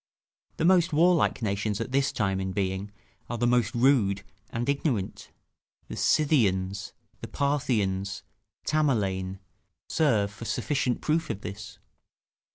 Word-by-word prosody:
The - - 0
most 180 -1 +4
warlike 170 -5 +3
nations 100 0 -1
at 115 +2 -4
this 140 +1 +2
time 95 -7 0
in 95 0 -3
being 95 0 -2 0.4
are 120 - -2
the 120 - +1
most 120 -2 +2
rude 115 -6 +3 0.3
and 120 +1 -3
ignorant: 135 - -1 0.6
the - - -5
Scythians, 100 -10 +1 0.3
the - - -7
Parthians, 105 -9 -1 0.4
Tamerlane, 100 -11 0 0.5
serve 110 -11 +2
for 110 +3 -9
sufficient 125 -1 -1
proof 160 0 0
of 105 -2 -4
this. 105 0 -8
115 Hz, 125 wpm, -27 LUFS, 100-140 Hz, 0.6 s, most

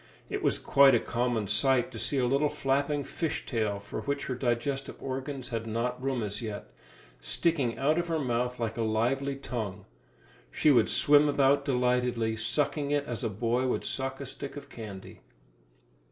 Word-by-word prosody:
It - - -2
was - - +2
quite 135 -2 +5
a - - +4
common 120 -2 -1
sight 120 +4 +3
to - - -7
see 140 - 0
a 130 - +2
little 140 +4 +2
flapping 140 +2 0
fish 160 +2 -3
tail 110 -5 -1
for 100 - -6
which 140 0 -2
her 130 - -2
digestive 125 +2 -1
organs 135 0 -5
had 115 -1 -3
not 120 +3 -2
room 130 -3 -1
as 105 +1 -4
yet, 110 -3 -6 0.5
sticking 115 - 0
out 150 +6 +2
of 175 - -2
her 165 -1 0
mouth 125 -3 -1
like 115 -1 -2
a - - -1
lively 125 +6 0
tongue. 105 -7 -5 0.6
She 150 - +3
would 120 -5 +4
swim 145 0 +5
about 140 0 +3
delightedly, 125 -3 +1
sucking 140 +6 -1
it 145 -1 +1
as 120 -5 -5
a - - 0
boy 120 +5 0
would - - -1
suck 135 0 -2
a 140 - -5
stick 135 +2 -7
of 140 0 -9
candy. 105 -5 -9
125 Hz, 180 wpm, -29 LUFS, 115-140 Hz, 0.6 s, quite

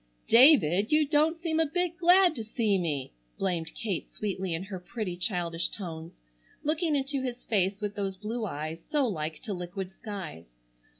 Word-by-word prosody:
"David, 225 - +6
you 305 0 +5
don't 310 +3 +3
seem 325 -1 -1
a 325 - +4
bit 355 +2 -1
glad 360 0 +5
to 235 -7 -5
see 215 -2 +1
me," 145 - -2 0.2
blamed 170 -4 -2
Kate 205 -8 -3
sweetly 190 -3 -3
in 165 - -4
her 195 -1 -6
pretty, 185 0 -4
childish 175 -2 -1
tones, 165 - -7 0.4
looking 310 +1 +1
into 275 0 -1
his 250 -1 -5
face 195 -2 +1
with 210 -1 -3
those 195 -2 -3
blue 215 +3 -3
eyes 155 0 -5
so 295 -3 +3
like 155 -8 -3
to 210 - -3
liquid 180 +1 -5
skies. 190 - -7
205 Hz, 170 wpm, -29 LUFS, 175-275 Hz, 0.4 s, David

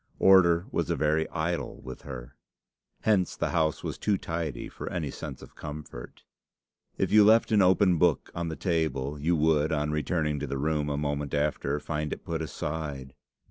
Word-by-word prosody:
Order 90 -2 +5
was - - -1
a - - +1
very 75 +1 +1
idol 85 +1 -3
with 65 0 -9
her. 65 -1 -9 0.7
Hence 100 -5 +2
the - - -1
house 80 -3 0
was - - -4
too 105 -2 +1
tidy 80 -7 -4
for - - -7
any - - -3
sense 70 -4 -7
of - - -13
comfort. 75 -5 -9 0.7
If - - 0
you 105 0 +7
left 110 +2 +5
an 105 -2 +5
open 95 -2 +4
book 85 -3 +2
on 85 0 -3
the 80 - -4
table, 75 -6 -1
you 85 +4 +2
would, 80 0 +2
on 75 -1 0
returning 75 -1 0
to - - -4
the 70 - -3
room 75 +1 0
a 70 - -1
moment 75 -1 -2
after, 75 0 0
find 75 0 -3
it - - -6
put 80 -1 -2
aside. 75 -4 -5
75 Hz, 180 wpm, -28 LUFS, 75-85 Hz, 0.7 s, you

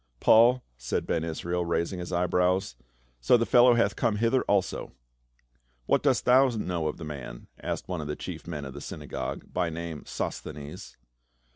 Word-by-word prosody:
"Paul?" 120 +3 +5
said 60 +1 -2
Ben 80 - 0
Israel, 85 +2 -2
raising 85 +2 -1
his 90 0 -6
eyebrows. 90 -3 +1 0.4
"So - - +5
the 115 - +1
fellow 120 0 +6
hath 105 -4 +2
come 115 -4 +1
hither 115 +4 +2
also." 100 -2 0 0.9
"What - - +2
dost - - +2
thou 130 +2 +6
know 90 -8 -2
of 75 - -3
the 85 - -8
man?" 70 -5 -7 0.2
asked - - -4
one 90 -3 -3
of 75 - -6
the 75 - -3
chief 85 -4 -7
men 75 -4 -5
of 65 - -7
the - - -8
synagogue, 75 -1 -5
by 90 -2 0
name 80 -1 -5
Sosthcnes. 75 -1 -6
90 Hz, 170 wpm, -28 LUFS, 75-105 Hz, 0.9 s, fellow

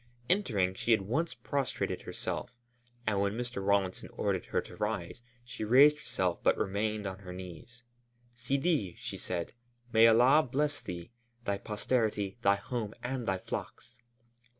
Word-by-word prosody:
Entering, 105 - +2
she 115 +4 +3
at 105 - -4
once 140 - -1
prostrated 140 -3 -2
herself, - - -5 0.5
and 100 -2 +1
when 100 0 +1
Mr. 120 -5 -3
Rawlinson 100 -2 +1
ordered - - -1
her - - +1
to - - -8
rise, - - -3 0.2
she 120 - -6
raised 140 +7 +7
herself 95 -10 -1
but - - +3
remained 105 +2 -1
on 95 -1 -4
her 95 -2 -9
knees. 95 +6 -10 0.5
"Sidi," 135 - 0
she - - -6
said, 85 -2 -4 0.4
"May 115 +1 +8
Allah 125 +7 +6
bless 145 +2 0
thee, 85 +3 -7 0.3
thy 100 -2 0
posterity, 105 -1 -1
thy 100 -3 +5
home, 110 +1 -4
and 125 -1 -3
thy 95 -1 +1
flocks!" 120 +5 -6
110 Hz, 150 wpm, -31 LUFS, 100-125 Hz, 0.5 s, May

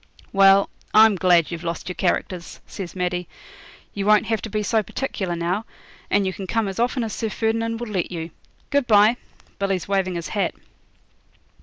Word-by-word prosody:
'Well, 195 0 +5 0.2
I'm 220 0 +8
glad 180 -3 +3
you've 170 0 -5
lost 170 -1 -4
your 180 - -3
characters,' 180 -1 -2
says 190 -4 -7
Maddie. 180 -1 -2 0.7
'You 200 0 -3
won't 210 0 +5
have 225 -1 -1
to 220 - -6
be 215 +1 -1
so 220 +1 +2
particular 195 -6 -3
now, 175 +5 -1 0.5
and 200 -1 +2
you 190 - -1
can 190 0 -7
come 225 +1 0
as 195 +1 -5
often 245 +1 +1
as 220 - -4
Sir 225 - -2
Ferdinand 225 +1 -1
will 240 -2 -5
let 185 -4 -1
you. 165 -1 -5 0.4
Good 285 -3 +2
bye. 215 +2 +5 0.4
Billy's 195 -2 -1
waving 190 -2 0
his 170 -1 -4
hat.' 205 - -1
195 Hz, 180 wpm, -23 LUFS, 180-220 Hz, 0.7 s, I'm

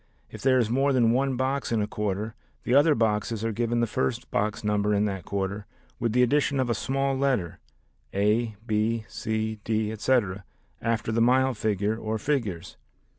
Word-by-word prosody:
If - - -9
there 130 -1 +4
is 120 -3 +2
more 135 +4 +2
than 120 -3 +4
one 135 +2 +1
box 130 +1 -1
in 115 - +2
a 105 - +1
quarter, 105 +1 -3 0.3
the 125 - 0
other 145 +2 +5
boxes 110 -1 0
are 115 - 0
given 120 +2 0
the - - +3
first 65 - -2
box 105 +1 -1
number 105 0 +1
in 100 +1 +2
that 95 -3 -3
quarter 100 0 -3 0.3
with 115 -1 0
the 125 +2 +4
addition 140 +2 +2
of 125 -2 +1
a - - +3
small 135 +4 -1
letter 130 -10 0 0.5
a, 105 +3 +1
b, 110 0 0
c, 110 0 -3
d, 110 -1 0
etc., 105 -4 0 0.4
after 115 -1 -1
the 115 +1 +1
mile 130 +2 +4
figure 105 -1 0
or 110 0 -2
figures. 110 - -2
110 Hz, 180 wpm, -26 LUFS, 105-125 Hz, 0.5 s, other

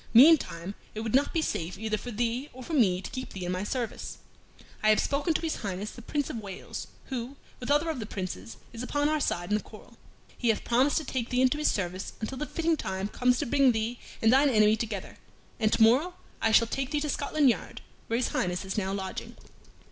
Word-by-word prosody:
Meantime 235 - +6 0.2
it 215 - -3
would 225 -1 -3
not 275 +3 +3
be 325 -2 +1
safe 170 - -2
either 220 0 -1
for 245 - -6
thee 240 +4 -1
or 255 +1 -9
for 325 - -6
me 195 -10 +3
to - - -6
keep 255 0 -6
thee 185 -2 -5
in 175 - -1
my 185 +1 -2
service. 235 +1 -3 0.6
I 215 - +4
have 215 - +5
spoken 290 +3 +1
to - - +1
his 325 -2 -1
Highness 200 0 -4
the 240 - -11
Prince 290 +4 -2
of - - -5
Wales, 200 -4 -7 0.2
who, 255 +1 -4 0.2
with 245 - -6
other 295 +3 +3
of 315 -5 -2
the 215 - -5
Princes, 115 - -5 0.2
is 230 - -6
upon 290 +3 0
our 310 0 +1
side 175 -8 -1
in - - +4
this 210 - 0
quarrel. - - -15 0.4
He 240 - 0
hath 220 - +1
promised 255 +5 +3
to 315 - -1
take 250 -3 -2
thee 255 0 +2
into 260 +3 +3
his 300 - +3
service 185 -1 -2
until 255 +4 -4
the 300 - -2
fitting 330 -1 +1
time 190 -4 -3
comes 250 +2 +2
to - - -1
bring 275 0 +4
thee 225 +2 -2 0.2
and 225 +2 +6
thine 280 +2 +6
enemy 215 -3 +5
together, 215 -3 -5 0.4
and 215 -1 +2
to 225 - +5
morrow 280 +11 +4 0.3
I 225 - +3
shall 230 - +6
take 265 +3 -2
thee 295 0 0
to 300 - -1
Scotland 285 -1 +3
Yard, - - -6 0.3
where 230 - +1
his 245 - 0
Highness 180 +1 -1
is 190 +2 -1
now 190 -1 -2
lodging." 190 -1 -5
235 Hz, 235 wpm, -28 LUFS, 205-280 Hz, 0.6 s, Meantime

